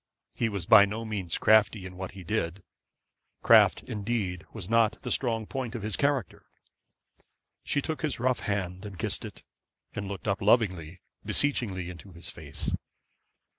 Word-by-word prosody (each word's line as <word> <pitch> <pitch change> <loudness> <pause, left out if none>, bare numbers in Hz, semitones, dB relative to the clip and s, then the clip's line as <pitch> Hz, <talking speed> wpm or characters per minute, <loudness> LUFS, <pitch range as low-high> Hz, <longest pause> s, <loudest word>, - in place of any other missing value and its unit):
He 115 - 0
was 100 -5 -3
by 100 - +8
no 110 +3 -5
means 100 -6 -3
crafty 110 -2 +4
in 90 0 -8
what 95 0 -6
he 95 -2 -10
did. 90 -1 -2 0.8
Craft - - +6
indeed 100 -4 -3
was 100 -6 -7
not 115 0 +3
the - - -3
strong 115 -4 0
point 125 0 -4
of 115 - -5
his 105 -1 -2
character. 140 - -1 1.2
She 145 - +1
took 160 -1 -3
his 155 -5 -2
rough 130 +1 +1
hand 95 -3 -3
and 100 -3 -8
kissed - - -3
it, - - -10 0.5
and 100 - -4
looked 100 +1 -6
up 100 - 0
lovingly, 95 -6 +2 0.2
beseechingly 100 -11 +1
into 90 +2 -12
his 85 - -6
face. - - -5
100 Hz, 160 wpm, -28 LUFS, 95-115 Hz, 1.2 s, by